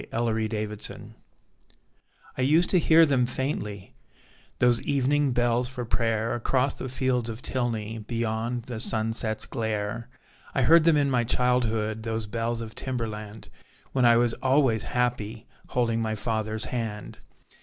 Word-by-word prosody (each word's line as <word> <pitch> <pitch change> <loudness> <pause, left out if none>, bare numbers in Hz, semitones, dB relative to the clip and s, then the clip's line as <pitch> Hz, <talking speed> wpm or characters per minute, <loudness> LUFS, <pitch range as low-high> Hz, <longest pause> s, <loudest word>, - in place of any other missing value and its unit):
Timberland 110 -1 0 0.4
Bells - - -9 1.4
I - - -3
used 155 +7 +3
to 185 - +5
hear 165 0 +6
them 130 -5 +2
faintly 105 -7 -4 0.6
Those 120 -1 +3
evening 140 0 +1
bells 120 0 +1
for 125 -1 -5
prayer, 115 -1 0
Across 130 +3 0
the 130 - -4
fields 125 -2 0
of 115 +2 -7
Tilney, 115 -3 -2
Beyond 115 +2 -2
the 120 -1 -6
sunset's 110 -1 -1
glare. 110 0 -3 0.5
I 135 - +2
heard 165 +4 +6
them 165 -3 +5
in 140 -1 +2
my 125 -2 +2
childhood, 115 -3 0
Those 110 0 -3
bells 115 +2 -2
of 110 -1 -7
Timberland, 110 -4 -4 0.4
When 130 - +1
I 120 -1 +6
was 120 -1 +2
always 130 -5 +2
happy, 120 -2 -2 0.2
Holding 115 -2 0
my 110 -1 -1
father's 110 0 -2
hand. 110 -4 -4
120 Hz, 140 wpm, -26 LUFS, 110-125 Hz, 1.4 s, hear